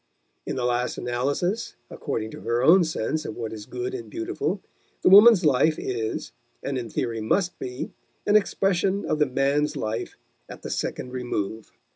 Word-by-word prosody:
In - - -2
the 125 - -1
last 125 0 0
analysis, 140 - -1 0.2
according 110 0 -4
to - - -9
her 120 +1 0
own 175 +6 +7
sense 155 -1 -2
of 110 - -6
what 115 -2 -5
is 105 -2 -8
good 380 +1 -4
and 380 -2 -6
beautiful, 340 +2 -2 0.4
the - - +6
woman's 205 -1 +8
life 150 +2 +4
is, 115 -3 -3 0.3
and 140 - -2
in 120 -3 -4
theory 115 0 -2
must 180 - 0
be, 125 0 -5 0.3
an 210 - +3
expression 195 -1 +2
of 155 - -1
the 150 - +4
man's 140 +3 +1
life 110 +1 -3 0.3
at - - -10
the - - -5
second 125 - -3
remove. 110 -4 -4
135 Hz, 170 wpm, -25 LUFS, 120-190 Hz, 0.4 s, woman's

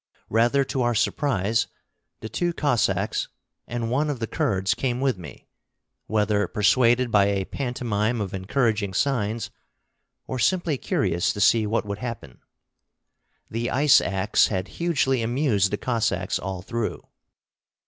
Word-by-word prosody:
Rather 120 +5 +3
to 135 0 -2
our 120 -1 +1
surprise, 110 -4 +1 0.5
the - - -5
two 175 +9 -1
Cossacks 140 -9 0 0.4
and 120 -1 -3
one 145 +4 +1
of 145 - -2
the 115 - -1
Kurds 95 -1 0
came 125 +1 -2
with 135 -3 +1
me, 80 -5 -11 0.6
whether 105 -1 +1
persuaded 120 +3 +3
by 100 -2 +5
a 100 -1 0
pantomime 120 -3 -2
of 100 -3 -4
encouraging 105 0 0
signs, 115 -4 -1 0.7
or 130 - -4
simply 165 - +1
curious 85 -3 0
to - - -7
see 110 +1 +4
what 110 0 0
would 100 0 -5
happen. 115 - -7 1.1
The 115 +2 -2
ice 140 +2 +5
axe 100 +2 +2
had 95 -2 -3
hugely 135 -7 +1
amused 115 -4 +1
the 105 - -2
Cossacks 105 -7 -1
all 95 -1 -5
through. 115 +1 -3
115 Hz, 140 wpm, -24 LUFS, 100-130 Hz, 1.1 s, by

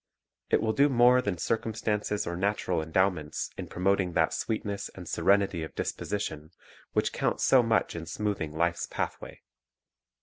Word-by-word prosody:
It - - +3
will 110 -1 +1
do 140 +6 +4
more 125 0 +5
than 100 -6 -2
circumstances 105 +1 -1
or 85 - -3
natural 100 -2 0
endowments 80 -1 0
in - - -6
promoting 95 0 +1
that 80 - +2
sweetness 105 -3 -3
and - - -9
serenity 100 -4 +2
of 80 - -7
disposition 80 -7 -3 0.4
which - - +1
count - - 0
so 130 - +5
much 115 -5 +1
in 85 -1 -6
smoothing 100 -3 -2
life's 85 +2 0
pathway. - - -5
100 Hz, 145 wpm, -28 LUFS, 85-110 Hz, 0.4 s, more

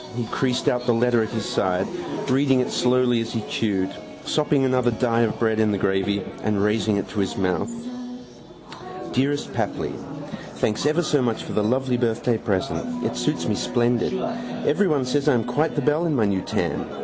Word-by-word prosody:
He 120 - -1
creased 125 -2 0
out 125 0 +1
the 120 - +4
letter 120 0 +3
at 110 - -1
his 110 -3 -3
side, 95 0 +1 0.4
reading 135 0 +3
it 125 - 0
slowly 125 -1 +2
as 115 - -4
he 115 -2 -2
chewed, 95 -4 0 0.3
sopping 150 -3 +2
another 125 -1 +2
die 115 0 +1
of 115 -2 +1
bread 110 -1 +1
in 110 -1 +3
the 100 - +1
gravy 95 +1 0 0.2
and 105 -2 0
raising 105 0 +2
it 100 - -2
to 105 - -4
his 95 -2 -1
mouth. 95 - 0 1.4
Dearest 140 +3 0
Papli - - -2 0.6
Thanks 110 +6 0
ever 155 +4 +2
so 150 -3 +2
much 115 -3 -1
for - - -6
the 105 - +1
lovely 130 +3 +1
birthday 120 -1 0
present. 245 - -2
It - - -1
suits 150 0 -1
me 110 - +1
splendid. 120 +2 +1 0.5
Everyone 150 -5 +2
says 145 +4 +1
I 140 - +4
am 115 - +1
quite 145 +7 0
the 145 - +1
belle 150 +5 +2
in 155 - +1
my 115 -4 +3
new 100 -2 +1
tam. - - -2
120 Hz, 190 wpm, -23 LUFS, 105-135 Hz, 1.4 s, the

